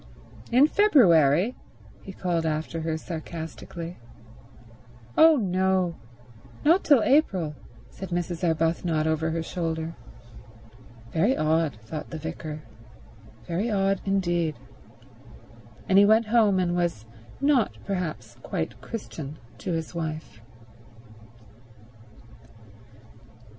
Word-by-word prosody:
"In 255 +4 +6
February?" 200 - +4 0.5
he 195 - -9
called 175 -3 -1
after 160 +1 -2
her 160 0 -2
sarcastically. 165 +1 -7 1.2
"Oh 320 0 +7
no—not 180 - -1
till 275 -7 +5
April," 190 - +2 0.4
said 190 - -8
Mrs. 175 0 -3
Arbuthnot 165 -1 +1
over 160 0 0
her 165 0 -2
shoulder. 165 -1 -3 1.2
"Very 200 - +2
odd," 155 -3 +1
thought 150 +7 -6
the 165 - -6
vicar. 155 -1 -6 0.8
"Very 185 +7 -1
odd 195 -2 +1
indeed." 175 -5 0 1.3
And 195 +1 +5
he 200 - +7
went 220 +2 +5
home 215 -3 +3
and 180 -2 +1
was 170 -11 -1 0.3
not 275 -6 +2
perhaps 155 - -4
quite 110 +6 -4
Christian 155 - -7 0.2
to 185 - -4
his 165 0 -3
wife. 155 -9 -5
170 Hz, 95 wpm, -26 LUFS, 160-195 Hz, 1.3 s, Oh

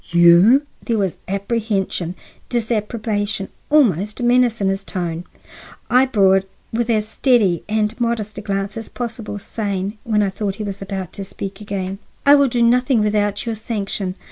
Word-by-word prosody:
"You?" 175 - +6 0.2
There 230 -2 0
was 195 -4 -1
apprehension, 195 -3 -2 0.3
disapprobation, 215 -3 -1 0.2
almost 215 - +3
menace 240 -1 +3
in 195 -1 +1
his 195 0 -1
tone. 175 -2 -4 0.7
I 255 +2 +5
bore 195 -6 +4
it 195 0 -4 0.2
with 235 +1 0
as 215 -2 +1
steady 220 - +2
and 215 +2 0
modest 225 -3 -1
a - - -6
glance 200 0 -3
as 225 - -6
possible, 230 -3 -5
saying, 205 -1 -3
when 210 -2 +2
I 195 - 0
thought 195 0 -3
he 215 - -5
was 200 -1 -5
about 190 -2 -5
to 200 - -6
speak 195 +1 -7
again: 195 -1 -4 0.3
"I 285 - +8
will 280 -1 +6
do 240 -1 +1
nothing 250 0 +3
without 205 0 0
your 230 - -1
sanction. 200 -4 -3
210 Hz, 165 wpm, -20 LUFS, 195-230 Hz, 0.7 s, I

